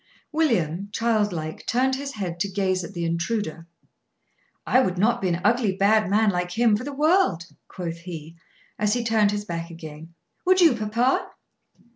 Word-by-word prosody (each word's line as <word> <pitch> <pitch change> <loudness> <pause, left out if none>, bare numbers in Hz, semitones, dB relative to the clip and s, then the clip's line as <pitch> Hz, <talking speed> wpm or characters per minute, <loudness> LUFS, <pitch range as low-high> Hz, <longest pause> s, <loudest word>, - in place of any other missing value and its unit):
William, 200 - 0
child 220 -2 +1
like, 160 -2 -5
turned 260 +2 +2
his 275 +1 -4
head 180 -5 -4
to 200 +2 0
gaze 185 -1 0
at 190 +3 -9
the 170 -1 -2
intruder. 170 0 -2 1.0
"I 255 - +4
would 185 -8 0
not 235 +5 +2
be 190 - 0
an 170 0 0
ugly 220 -1 +2
bad 205 0 +3
man 210 +1 +3
like 180 -1 -2
him 230 -1 +3
for 220 - -4
the 285 - -5
world," 300 - +2 0.2
quoth 170 -2 -6
he, 165 -2 -8 0.4
as 210 0 +2
he 245 - 0
turned 220 -2 +3
his 205 0 -3
back 170 -3 -5
again. 160 0 -10 0.3
"Would 370 0 +5
you, 335 -6 +6
papa?" 230 +4 0
205 Hz, 175 wpm, -24 LUFS, 170-235 Hz, 1.0 s, you